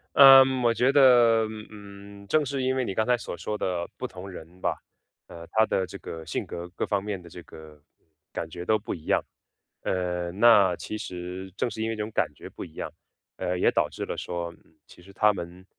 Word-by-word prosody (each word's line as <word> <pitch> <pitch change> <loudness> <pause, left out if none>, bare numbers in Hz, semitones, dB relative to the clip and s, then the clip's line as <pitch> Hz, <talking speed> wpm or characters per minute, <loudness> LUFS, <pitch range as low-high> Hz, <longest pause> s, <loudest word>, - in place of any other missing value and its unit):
呃， 135 -1 +10 0.2
我 120 -1 +3
觉 125 +3 +3
得， 120 -5 +6 0.2
嗯， 100 -1 -12
正 150 +8 +2
是 135 0 -2
因 130 0 +1
为 130 - 0
你 95 - -3
刚 110 +1 +1
才 125 - +3
所 115 -7 -7
说 105 +5 -4
的 90 -3 -2
不 125 - -4
同 95 -4 -8
人 90 -1 -11
吧， - - -1 0.5
呃， 85 0 -11
他 110 0 +4
的 95 - 0
这 - - -8
个 80 -1 -8
性 80 - -3
格 85 +1 -7
各 - - -1
方 100 -2 0
面 100 -2 -4
的 85 - -13
这 90 - -10
个 75 -1 -14 0.5
感 80 - -4
觉 85 +2 -7
都 110 +3 +3
不 105 - -5
一 80 -4 -9
样， - - +2 0.6
呃， 90 -1 -1
那 100 -3 +6
其 110 - -6
实 90 0 -6
正 120 - -1
是 110 - -5
因 110 - -1
为 115 - -2
这 105 - -3
种 110 - -6
感 80 - +1
觉 - - -10
不 - - -8
一 80 - -15
样， - - -5 0.5
呃， 90 0 -2
也 - - +3
导 - - +2
致 - - -6
了 - - -4
说 85 -1 -4 0.3
其 - - -17
实 100 +2 -16
他 105 +2 +4
们， 90 0 -8
100 Hz, 240 characters per minute, -26 LUFS, 90-110 Hz, 0.6 s, 呃